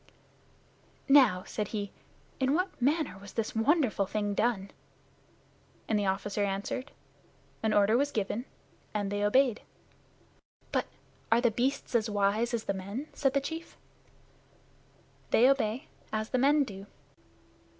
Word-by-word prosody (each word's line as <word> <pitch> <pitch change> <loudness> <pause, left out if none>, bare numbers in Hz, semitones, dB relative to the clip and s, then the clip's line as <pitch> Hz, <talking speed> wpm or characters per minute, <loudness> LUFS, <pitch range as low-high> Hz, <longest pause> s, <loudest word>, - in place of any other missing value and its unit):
"Now," 255 -10 +6
said 210 -2 -3
he, 205 -2 -4 0.5
"in 265 +2 +2
what 365 -4 -2
manner 285 - +1
was 200 0 -12
this 225 -1 -2
wonderful 225 - +2
thing 205 0 -1
done?" 200 -3 0 1.2
And 215 -2 +2
the 200 - 0
officer 200 +2 -1
answered, 200 +7 -3 0.7
"An 220 - +1
order 205 +1 +4
was 285 +3 +2
given, 220 0 -2 0.5
and 205 -1 -1
they 205 0 -1
obeyed." 245 +2 +3 1.1
"But - - 0 0.4
are 230 - +6
the 240 -1 +3
beasts 260 +5 -1
as 230 -2 +2
wise 205 +3 +1
as 225 - -3
the 200 - -1
men?" 200 +10 -6
said 270 -1 0
the 280 - +3
chief. 320 +4 -6 1.5
"They 245 - +5
obey, 265 -2 +1 0.3
as 215 0 -2
the 255 - +2
men 285 +3 +4
do. 200 -5 -8
220 Hz, 135 wpm, -30 LUFS, 205-270 Hz, 1.5 s, Now